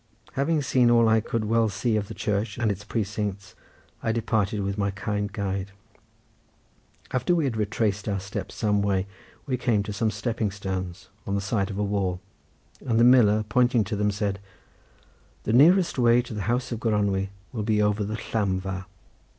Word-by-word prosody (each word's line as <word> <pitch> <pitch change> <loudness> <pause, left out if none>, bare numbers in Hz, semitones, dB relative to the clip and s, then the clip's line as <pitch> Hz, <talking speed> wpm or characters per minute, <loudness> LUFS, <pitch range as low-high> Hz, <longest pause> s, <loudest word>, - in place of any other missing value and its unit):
Having 145 +2 +1
seen 125 -3 +3
all 115 -1 +5
I 110 0 +4
could 115 0 -2
well 115 +1 +2
see 110 +3 0
of 105 -2 -1
the - - -8
church 105 0 -2
and 115 -3 +1
its 100 0 -5
precincts 100 -3 -3 0.5
I 115 - 0
departed 110 -3 0
with 100 0 -2
my 100 -1 0
kind 105 +1 -3
guide. 100 -1 -3 1.4
After 130 +7 +1
we 165 - +1
had 130 -5 -1
retraced 105 -1 -1
our 100 -1 0
steps 95 0 -6
some 105 -2 +1
way, 100 -2 +1 0.4
we 130 -2 -1
came 115 -5 +1
to 105 0 -5
some 110 +1 0
stepping 110 +1 -2
stones 95 -1 -5 0.2
on 100 - 0
the - - +1
side 100 0 -1
of 100 - -5
a 105 - 0
wall, 100 -3 -1 0.6
and 115 -4 +1
the - - +6
miller 110 -4 +6
pointing 120 -2 +3
to 105 +2 -3
them 105 0 +1
said: 100 -1 -2 1.0
"The 110 - -1
nearest 170 +5 +5
way 120 0 +5
to 120 - -8
the 105 - -3
house 125 +2 0
of 115 - -3
Gronwy 100 -4 0 0.2
will 115 -5 -3
be 105 0 +1
over 105 0 +2
the 105 +2 -3 0.2
llamfa." 95 -3 -1
105 Hz, 185 wpm, -26 LUFS, 100-115 Hz, 1.4 s, the